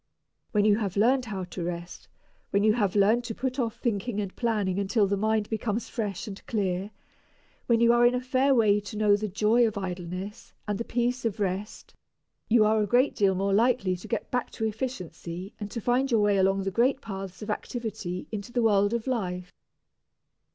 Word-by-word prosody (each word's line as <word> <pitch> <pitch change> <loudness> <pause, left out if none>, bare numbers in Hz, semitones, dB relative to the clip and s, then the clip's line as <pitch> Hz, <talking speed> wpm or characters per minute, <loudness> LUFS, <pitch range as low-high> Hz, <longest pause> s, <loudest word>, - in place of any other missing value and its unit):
When 210 -1 +2
you 210 -1 +5
have 200 -4 -3
learned 250 +5 +3
how 195 -4 -4
to 180 0 -6
rest, 175 0 -6 0.4
when 200 +1 +1
you 215 0 +5
have 205 -5 0
learned 210 +4 +4
to 225 -2 -4
put 260 +1 -3
off 230 -2 -1
thinking 225 -1 -2
and 200 -2 -4
planning 210 -5 0
until 200 +2 +2
the 200 +1 0
mind 215 +1 0
becomes 220 0 -2
fresh 215 0 -4
and 200 -2 -8
clear, 195 -3 -1 0.8
when 235 -1 +3
you 235 0 +6
are 240 0 +4
in 240 +1 +5
a - - +1
fair 260 +2 +2
way 210 -3 +4
to 205 +1 -8
know 210 -1 +4
the 215 +1 -2
joy 215 +4 +3
of 215 -1 -4
idleness 185 +1 -6
and 205 -1 -2
the - - -1
peace 245 +1 -1
of 225 -3 -2
rest, 200 +1 -3 0.6
you 225 -1 +5
are 215 0 +3
a 210 - 0
great 250 +6 +3
deal 195 -2 +2
more 195 +1 0
likely 220 -4 +2
to 175 - -11
get 230 - -3
back 250 -1 -1
to 220 - -2
efficiency 190 -5 -5
and 205 -1 -5
to 230 - -4
find 250 +4 +1
your 230 -4 +3
way 205 -1 +3
along 195 +1 +2
the 195 - -2
great 250 +6 +2
paths 195 -4 -7
of 210 - -3
activity 210 -6 -4
into 210 +1 -5
the 240 -1 +1
world 205 0 +3
of 235 - -3
life. 180 -8 -3
210 Hz, 205 wpm, -27 LUFS, 195-235 Hz, 0.8 s, you